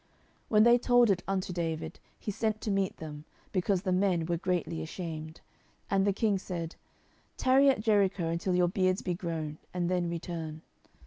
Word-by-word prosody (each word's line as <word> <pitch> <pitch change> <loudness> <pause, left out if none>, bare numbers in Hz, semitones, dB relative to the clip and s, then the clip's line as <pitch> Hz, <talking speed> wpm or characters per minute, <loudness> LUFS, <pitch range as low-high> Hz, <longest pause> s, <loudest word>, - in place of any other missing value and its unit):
10:010:005 - - -37 0.4
When 215 -1 +6
they 235 +1 +7
told 245 -2 +5
it 185 -2 0
unto 190 -1 -1
David, 165 -2 -3 0.2
he 210 - -3
sent 215 +1 -1
to 215 - -2
meet 195 -1 0
them, 150 -2 -8 0.3
because 185 0 +1
the 185 - 0
men 180 -3 +2
were 170 +1 0
greatly 170 -2 -1
ashamed: 160 -1 -6 0.5
and 195 0 +3
the - - +4
king 200 0 +1
said, 170 -3 -5 0.6
Tarry 265 +2 +5
at 265 - +2
Jericho 200 -5 +2
until 170 +3 0
your 180 -1 +4
beards 185 +1 +1
be 180 - -1
grown, 160 -3 -4 0.2
and 175 0 0
then 175 -2 +1
return. 165 -2 -5
180 Hz, 180 wpm, -30 LUFS, 165-200 Hz, 0.6 s, they